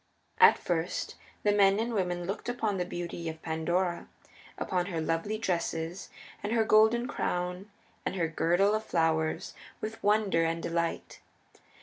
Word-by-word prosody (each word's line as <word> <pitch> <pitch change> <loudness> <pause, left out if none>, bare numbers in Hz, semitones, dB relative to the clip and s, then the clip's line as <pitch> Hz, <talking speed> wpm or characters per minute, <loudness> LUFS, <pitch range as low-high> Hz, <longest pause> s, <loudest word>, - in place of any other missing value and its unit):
At 460 -1 +8
first 170 -1 -2 0.3
the 210 - +4
men 200 0 +4
and 235 +1 -1
women 180 -4 -1
looked 195 +6 -4
upon 220 -5 -1
the 180 - -1
beauty 175 -1 -5
of 160 0 -7
Pandora, 170 +2 -1 0.5
upon 180 -1 -1
her 170 -4 -3
lovely 165 +7 -1
dresses, 175 -3 -2 0.3
and 210 +2 -2
her 225 -1 +3
golden 220 +3 +4
crown 180 -6 -2 0.3
and - - -2
her 170 -3 +1
girdle 175 +5 +2
of 215 0 0
flowers, 160 -4 0 0.3
with 220 +1 -6
wonder 205 -5 +3
and 165 0 -1
delight. 170 0 -2
180 Hz, 145 wpm, -30 LUFS, 165-210 Hz, 0.5 s, At